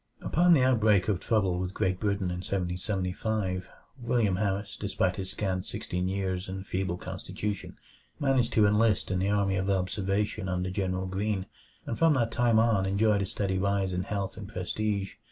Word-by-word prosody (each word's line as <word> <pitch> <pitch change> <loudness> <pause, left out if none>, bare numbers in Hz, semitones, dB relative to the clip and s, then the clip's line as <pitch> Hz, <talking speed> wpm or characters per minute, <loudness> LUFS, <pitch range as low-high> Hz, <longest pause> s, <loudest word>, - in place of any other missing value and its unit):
Upon 175 +1 +4
the 130 - +4
outbreak 110 -6 +4
of 95 -4 +1
trouble 95 -5 +1
with 90 +1 -3
Great 95 0 0
Britain 100 -3 0
in 90 - -3
1775, 95 +1 -2 0.3
William 115 -6 +1
Harris, 100 0 -1
despite 95 -2 -1
his 95 -1 -4
scant 95 -3 -2
sixteen 90 0 -3
years 95 -1 -2
and 95 0 -5
feeble 95 -2 -2
constitution, 95 +3 -5 0.4
managed 135 -4 +2
to 110 - +5
enlist 105 -1 +2
in 95 - +1
the 95 +2 +1
Army 100 -2 +2
of 95 +1 -1
Observation 95 +1 0
under 90 0 -1
General 95 0 -1
Greene; 95 +1 -1 0.4
and 115 - -4
from 165 -2 +5
that 115 -3 +1
time 120 0 +3
on 110 -4 +3
enjoyed 100 +1 +2
a 100 - -1
steady 95 -1 -1
rise 100 -1 +1
in 90 - 0
health 100 0 -3
and 105 -2 -7
prestige. 100 +1 -2
100 Hz, 170 wpm, -29 LUFS, 95-105 Hz, 0.4 s, to